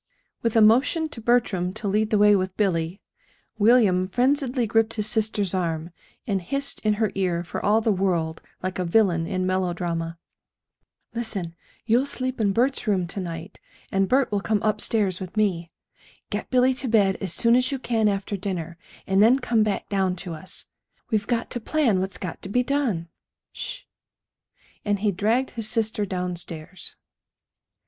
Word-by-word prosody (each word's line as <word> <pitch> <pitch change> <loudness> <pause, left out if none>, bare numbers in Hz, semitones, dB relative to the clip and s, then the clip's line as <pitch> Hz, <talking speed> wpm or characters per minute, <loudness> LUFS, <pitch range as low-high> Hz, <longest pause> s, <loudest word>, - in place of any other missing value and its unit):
With 230 -1 -1
a 225 - +6
motion 265 +9 +4
to 230 - -7
Bertram 215 -6 +1
to 205 - -4
lead 210 +2 +1
the 215 - +2
way 210 0 +6
with 185 -1 -2
Billy, 180 -2 -1 0.6
William 205 -5 +4
frenziedly 255 +2 +1
gripped 225 +1 +1
his 210 -2 0
sister's 215 -3 0
arm, 165 -2 -2 0.3
and 200 -6 -1
hissed 275 +10 0
in 215 -1 +1
her 215 -1 0
ear 180 -3 0
for 175 - -6
all 215 +2 +3
the 220 - +2
world 175 -5 0 0.2
like 185 0 -3
a - - +1
villain 170 -3 +2
in 185 -1 -1
melodrama: 175 -3 -2 1.0
"Listen! 205 -8 -3 0.3
You'll 240 +5 +3
sleep 255 -3 -2
in 200 -2 +2
Bert's 245 +4 0
room 190 -4 +2
to 195 - -4
night, 170 0 -6 0.3
and 195 -1 +1
Bert 265 -2 +2
will 205 -1 0
come 215 0 0
up 215 -1 +1
stairs 200 -5 +1
with 185 +2 -8
me. 180 -6 +1 0.6
Get - - -3
Billy 255 0 +4
to 260 +1 -1
bed 205 -4 +3
as 190 -4 -4
soon 230 +6 +3
as 255 +2 +3
you 275 - -1
can 230 -4 0
after 200 0 -1
dinner, 175 -4 -5 0.3
and 195 +1 +3
then 235 +5 +6
come 240 -4 +1
back 210 -2 -1
down 190 -2 0
to 180 -1 -7
us. 160 +4 -6 0.5
We've 210 -2 0
got 235 -1 -1
to 240 - -1
plan 240 -5 +1
what's 190 +1 -2
got 180 -3 -6
to 190 - -7
be 250 +5 +2
done. 245 -12 -1 0.4
Sh - - -6
h!" - - -36 1.0
And 205 -1 0
he 210 -1 +2
dragged 220 +8 0
his 225 -3 -3
sister 220 -2 0
downstairs. 180 -2 -5
205 Hz, 175 wpm, -24 LUFS, 185-230 Hz, 1.0 s, a